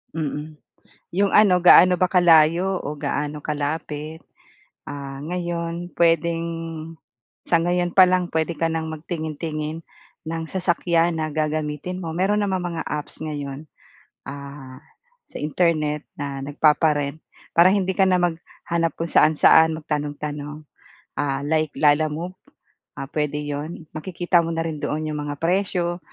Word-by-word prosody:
Mm. 150 Hz, -1 st, -4 dB, 0.5 s
'Yong 195 Hz, +3 st, +1 dB
ano, 200 Hz, -4 st, +6 dB
gaano 180 Hz, 0 st, +7 dB
ba 185 Hz, -, +3 dB
kalayo 175 Hz, +1 st, +4 dB
o 145 Hz, -, -3 dB
gaano 145 Hz, 0 st, -3 dB
kalapit? 150 Hz, +1 st, -4 dB, 0.6 s
Ah, 140 Hz, -1 st, -7 dB
ngayon 170 Hz, 0 st, -4 dB
pwedeng 165 Hz, 0 st, +2 dB, 1.0 s
sa 170 Hz, -, +5 dB
ngayon 175 Hz, +1 st, 0 dB
pa 185 Hz, -, +10 dB
lang, 180 Hz, -1 st, +1 dB
pwede 160 Hz, +1 st, -1 dB
ka 165 Hz, +1 st, -1 dB
nang 160 Hz, 0 st, -2 dB
magtingin-tingin 155 Hz, 0 st, -4 dB, 0.5 s
ng 165 Hz, 0 st, -3 dB
sasakyan 170 Hz, -2 st, +1 dB
na 155 Hz, -, -1 dB
gagamitin 155 Hz, +2 st, -2 dB
mo. 165 Hz, -3 st, -5 dB
Mayro'n 195 Hz, +4 st, +1 dB
namang 185 Hz, -2 st, -1 dB
mga -, -, -3 dB
apps 150 Hz, -1 st, -5 dB
ngayon, 145 Hz, -2 st, -5 dB, 0.6 s
ah, 140 Hz, -1 st, -9 dB, 0.5 s
sa -, -, -7 dB
Internet 150 Hz, -1 st, 0 dB, 0.2 s
na 140 Hz, -1 st, -4 dB
nagpapa-rent. 150 Hz, 0 st, +1 dB, 0.3 s
Para 170 Hz, +2 st, +7 dB
hindi 190 Hz, -2 st, 0 dB
ka 195 Hz, -, +5 dB
na 185 Hz, -1 st, +3 dB
maghanap 170 Hz, -1 st, -2 dB
kung 165 Hz, -, -2 dB
saan-saan, 160 Hz, +1 st, +5 dB
magtanong-tanong, 150 Hz, 0 st, -5 dB, 0.6 s
ah, 140 Hz, -1 st, -2 dB
like 155 Hz, +1 st, +1 dB
Lalamove, 155 Hz, +3 st, +2 dB, 0.7 s
ah, -, -, -4 dB
pwede 150 Hz, -1 st, -1 dB
'yon. 150 Hz, +3 st, -5 dB
Makikita 175 Hz, +2 st, +1 dB
mo -, -, -3 dB
na 165 Hz, -, -1 dB
rin 160 Hz, -2 st, -4 dB
doon 155 Hz, +1 st, -2 dB
'yong 150 Hz, -1 st, -3 dB
mga 145 Hz, 0 st, -4 dB
presyo, 175 Hz, 0 st, 0 dB
160 Hz, 130 wpm, -23 LUFS, 150-175 Hz, 1.0 s, pa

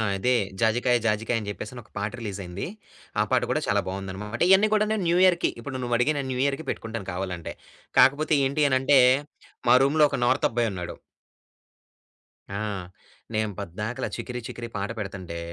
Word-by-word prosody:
అదే. 125 Hz, +6 st, +1 dB, 0.3 s
'జాజికాయ 120 Hz, +2 st, +3 dB
జాజికాయ' 110 Hz, +2 st, +1 dB
అని 105 Hz, -2 st, -6 dB
చెప్పేసి 105 Hz, +3 st, -6 dB
ఒక 110 Hz, -, -27 dB
పాట 105 Hz, +1 st, -2 dB
రిలీజ్ 105 Hz, -4 st, -5 dB
అయింది. 90 Hz, +2 st, -5 dB, 0.5 s
ఆ -, -, +5 dB
పాట -, -, +4 dB
కూడా -, -, +1 dB
చాలా -, -, +2 dB
బాగుంది 95 Hz, 0 st, -4 dB
అన్నమాట. 105 Hz, +4 st, -6 dB
ఇవన్నీ 190 Hz, +3 st, +6 dB
కూడా 215 Hz, 0 st, +3 dB
నేను 215 Hz, -3 st, 0 dB
న్యూ 170 Hz, +1 st, +3 dB
ఇయర్‌కి 175 Hz, -2 st, +4 dB
ఇప్పుడు 135 Hz, +2 st, -6 dB
నువ్వు 120 Hz, -1 st, 0 dB
అడిగావు 145 Hz, +5 st, +2 dB
నేను 135 Hz, -1 st, -3 dB
న్యూ 125 Hz, -, -2 dB
ఇయర్‌కి 140 Hz, +3 st, -1 dB
పెట్టుకుంటాను. 115 Hz, -3 st, -5 dB
కావాలి 90 Hz, 0 st, -3 dB
అంటే, 85 Hz, -, -7 dB, 0.5 s
కాకపోతే 150 Hz, +4 st, +5 dB
ఏంటి 145 Hz, +3 st, +2 dB
అని 130 Hz, -, +3 dB
అంటే 135 Hz, +1 st, +5 dB, 0.7 s
మా -, -, +8 dB
రూమ్‌లో 150 Hz, +2 st, +4 dB
ఒక -, -, -1 dB
నార్తబ్బాయున్నాడు. 115 Hz, -7 st, 0 dB, 1.6 s
ఆ! -, -, -4 dB, 0.8 s
నేను 110 Hz, -1 st, 0 dB
పద్దాకల 105 Hz, +7 st, -4 dB
'చికిరి 125 Hz, -1 st, -5 dB
చికిరి' 120 Hz, 0 st, -7 dB
పాట 100 Hz, 0 st, -2 dB
పెడుతుంటే 95 Hz, -4 st, -5 dB
115 Hz, 170 wpm, -26 LUFS, 100-135 Hz, 1.6 s, మా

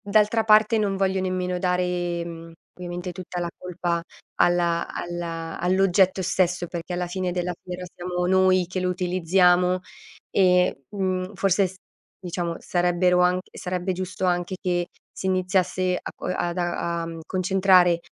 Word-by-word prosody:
d'altra 215 Hz, +2 st, +2 dB
parte 215 Hz, +1 st, +5 dB
non 200 Hz, -2 st, 0 dB
voglio 190 Hz, 0 st, +1 dB
nemmeno 185 Hz, -1 st, -1 dB
dare, 180 Hz, -1 st, -1 dB
mhmm, 165 Hz, -1 st, -9 dB, 0.2 s
ovviamente 175 Hz, 0 st, -6 dB
tutta 180 Hz, 0 st, -6 dB
la 175 Hz, -, -2 dB
colpa 175 Hz, -1 st, -2 dB, 0.4 s
alla 170 Hz, -1 st, +2 dB
alla 165 Hz, -1 st, -5 dB
all'oggetto 190 Hz, +1 st, +3 dB
stesso, 180 Hz, -1 st, 0 dB
perché 170 Hz, +1 st, -6 dB
alla 175 Hz, 0 st, -2 dB
fine 185 Hz, 0 st, -2 dB
della 180 Hz, 0 st, -2 dB
fiera 180 Hz, 0 st, -7 dB
siamo 180 Hz, 0 st, -3 dB
noi 185 Hz, -1 st, +4 dB
che 185 Hz, +1 st, -4 dB
lo 180 Hz, -, 0 dB
utilizziamo 180 Hz, 0 st, +2 dB, 0.5 s
e, 180 Hz, -6 st, +3 dB
mhmm, 185 Hz, -1 st, -2 dB
forse 195 Hz, 0 st, +2 dB
s 185 Hz, -, -9 dB, 0.5 s
diciamo 175 Hz, -1 st, -3 dB
sarebbero 180 Hz, 0 st, +2 dB
anch 180 Hz, +1 st, +1 dB
sarebbe 180 Hz, +1 st, -3 dB
giusto 185 Hz, 0 st, -3 dB
anche 175 Hz, +1 st, 0 dB
che 175 Hz, -2 st, 0 dB, 0.2 s
si 190 Hz, -, -6 dB
iniziasse 185 Hz, 0 st, +1 dB
a -, -, -6 dB
co -, -, -8 dB
ad 175 Hz, -1 st, -2 dB
a 170 Hz, -1 st, -1 dB
a, 165 Hz, -, -4 dB
mhmm, 165 Hz, 0 st, -7 dB
concentrare 185 Hz, -2 st, +4 dB
180 Hz, 150 wpm, -24 LUFS, 175-185 Hz, 0.5 s, parte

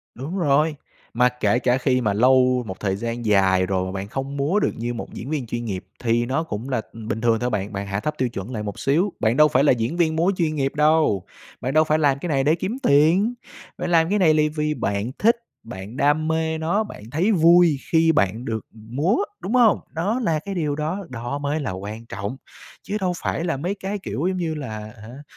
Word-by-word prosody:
Đúng 145 Hz, +9 st, -5 dB
rồi, 150 Hz, -1 st, +2 dB, 0.4 s
mà 125 Hz, +1 st, +4 dB
kể 125 Hz, -1 st, 0 dB
cả 125 Hz, +1 st, +2 dB
khi 130 Hz, -1 st, +1 dB
mà 105 Hz, -4 st, +1 dB
lâu 125 Hz, +2 st, +4 dB
một 95 Hz, -, -7 dB
thời 95 Hz, -2 st, -1 dB
gian 115 Hz, +2 st, -4 dB
dài 95 Hz, -2 st, +3 dB
rồi, 95 Hz, -1 st, 0 dB
mà 95 Hz, -, -5 dB
bạn 100 Hz, 0 st, -5 dB
không 135 Hz, +4 st, -4 dB
múa 145 Hz, +9 st, +1 dB
được -, -, +1 dB
như 120 Hz, +1 st, -3 dB
một 115 Hz, -, -7 dB
diễn 130 Hz, -, -7 dB
viên 145 Hz, -6 st, -2 dB
chuyên 120 Hz, +1 st, -4 dB
nghiệp, 95 Hz, -4 st, -4 dB
thì 120 Hz, 0 st, +1 dB
nó 135 Hz, +6 st, 0 dB
cũng 115 Hz, -3 st, -5 dB
là, 125 Hz, -3 st, 0 dB
ừm, 110 Hz, -1 st, -9 dB
bình 110 Hz, 0 st, -2 dB
thường 115 Hz, -1 st, +2 dB
thôi 125 Hz, -, -1 dB
bạn. 105 Hz, -2 st, -2 dB
Bạn 100 Hz, 0 st, -4 dB
hạ 100 Hz, 0 st, -2 dB
thấp 150 Hz, +6 st, -2 dB
tiêu 130 Hz, -1 st, +1 dB
chuẩn 100 Hz, -1 st, -6 dB
lại 105 Hz, -2 st, -3 dB
một 100 Hz, -2 st, -6 dB
xíu, 170 Hz, +8 st, +1 dB
bạn 110 Hz, +2 st, +2 dB
đâu 150 Hz, +1 st, +6 dB
phải 135 Hz, 0 st, +3 dB
là -, -, +6 dB
diễn 120 Hz, +7 st, -2 dB
viên 160 Hz, -2 st, +1 dB
múa 175 Hz, +5 st, +2 dB
chuyên 160 Hz, -3 st, 0 dB
nghiệp 135 Hz, -1 st, -1 dB
đâu. 150 Hz, -, +3 dB, 0.4 s
Bạn 130 Hz, -, -2 dB
đâu 155 Hz, 0 st, +5 dB
phải 155 Hz, 0 st, +2 dB
làm 140 Hz, -3 st, +2 dB
cái 175 Hz, -, -5 dB
này 135 Hz, -4 st, +1 dB
để 155 Hz, +3 st, +4 dB
kiếm 190 Hz, +8 st, -3 dB
tiền, 170 Hz, +11 st, +4 dB, 0.4 s
bạn -, -, -3 dB
làm 165 Hz, -1 st, +4 dB
cái 210 Hz, -, +2 dB
này 160 Hz, -5 st, +4 dB
là 150 Hz, 0 st, +3 dB
vì 150 Hz, 0 st, -1 dB
bạn 100 Hz, +1 st, -2 dB
thích, 230 Hz, +3 st, +4 dB, 0.3 s
bạn 110 Hz, +1 st, -9 dB
đam 150 Hz, +2 st, +2 dB
mê 160 Hz, 0 st, 0 dB
nó, 175 Hz, +7 st, 0 dB
bạn 205 Hz, -, -10 dB
thấy 180 Hz, +9 st, +1 dB
vui 170 Hz, -3 st, +5 dB
khi 165 Hz, 0 st, +4 dB
bạn 110 Hz, -2 st, 0 dB
được 110 Hz, -2 st, -3 dB
múa, 120 Hz, -, -1 dB, 0.2 s
đúng 205 Hz, -, -4 dB
hông? 235 Hz, -4 st, +5 dB
Đó 205 Hz, +10 st, -1 dB
là 160 Hz, -4 st, +1 dB
cái 195 Hz, +5 st, -6 dB
điều 150 Hz, -4 st, -1 dB
đó, 165 Hz, +5 st, -3 dB
đó 120 Hz, +2 st, -4 dB
mới 145 Hz, +2 st, -2 dB
là 135 Hz, -, -3 dB
quan 105 Hz, +5 st, -7 dB
trọng, 100 Hz, +4 st, -5 dB, 0.5 s
chứ 205 Hz, -, -4 dB
đâu 185 Hz, -2 st, 0 dB
phải 165 Hz, -, -1 dB
là 165 Hz, -5 st, -1 dB
mấy 175 Hz, +8 st, -2 dB
cái, 200 Hz, +1 st, -4 dB
kiểu, 175 Hz, -3 st, -3 dB
giống 185 Hz, -, 0 dB
như 165 Hz, -3 st, -2 dB
là 125 Hz, -8 st, -5 dB
hả, 110 Hz, +5 st, -11 dB
140 Hz, 240 wpm, -23 LUFS, 115-160 Hz, 0.5 s, đâu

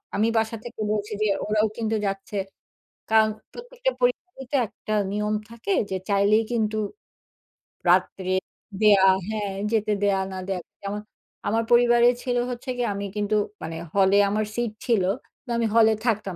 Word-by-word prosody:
আমি 215 Hz, +2 st, +2 dB
বাসা 225 Hz, +1 st, 0 dB
থেকে 240 Hz, -2 st, -8 dB
বলছি 210 Hz, 0 st, -2 dB
যে, 215 Hz, -, +3 dB, 0.2 s
ওরাও 215 Hz, +1 st, +2 dB
কিন্তু 225 Hz, -1 st, -1 dB
যাচ্ছে। 195 Hz, +1 st, -4 dB, 0.7 s
কারণ 220 Hz, 0 st, +5 dB, 0.2 s
প্রত্যেকটা -, -, -3 dB
পরিবারে 430 Hz, -, -1 dB
তো -, -, 0 dB
একটা 215 Hz, -, -6 dB, 0.2 s
নিয়ম 210 Hz, +1 st, -1 dB, 0.2 s
থাকে। 230 Hz, -, -5 dB, 0.2 s
যে 190 Hz, -, -2 dB
চাইলেই 205 Hz, +2 st, +4 dB
কিন্তু 220 Hz, -2 st, 0 dB, 1.1 s
রাত্রে 185 Hz, -1 st, +2 dB, 0.5 s
দেয়া 205 Hz, -3 st, +6 dB, 0.2 s
হ্যাঁ, 210 Hz, -2 st, -2 dB, 0.2 s
যেতে 215 Hz, -2 st, +1 dB
দেয়া 200 Hz, -1 st, +3 dB
না 190 Hz, -, -5 dB
দেয়া। 190 Hz, -2 st, -1 dB, 0.2 s
যেমন 205 Hz, +1 st, -4 dB, 0.5 s
আমার 225 Hz, +2 st, +1 dB
পরিবারে 240 Hz, 0 st, +6 dB, 0.2 s
ছিল, 245 Hz, -2 st, 0 dB
হচ্ছে 245 Hz, +2 st, -6 dB
গিয়ে 245 Hz, -1 st, 0 dB
আমি 200 Hz, 0 st, -4 dB
কিন্তু, 210 Hz, 0 st, 0 dB, 0.3 s
মানে, 165 Hz, +1 st, -5 dB, 0.2 s
হলে 195 Hz, 0 st, +5 dB
আমার 215 Hz, +1 st, 0 dB
সিট 240 Hz, -2 st, -1 dB
ছিল 230 Hz, -6 st, +2 dB, 0.4 s
তো, -, -, -15 dB
আমি 235 Hz, -, +1 dB
হলে 225 Hz, -1 st, +6 dB
থাকতাম 210 Hz, -5 st, 0 dB
215 Hz, 155 wpm, -25 LUFS, 200-235 Hz, 1.1 s, দেয়া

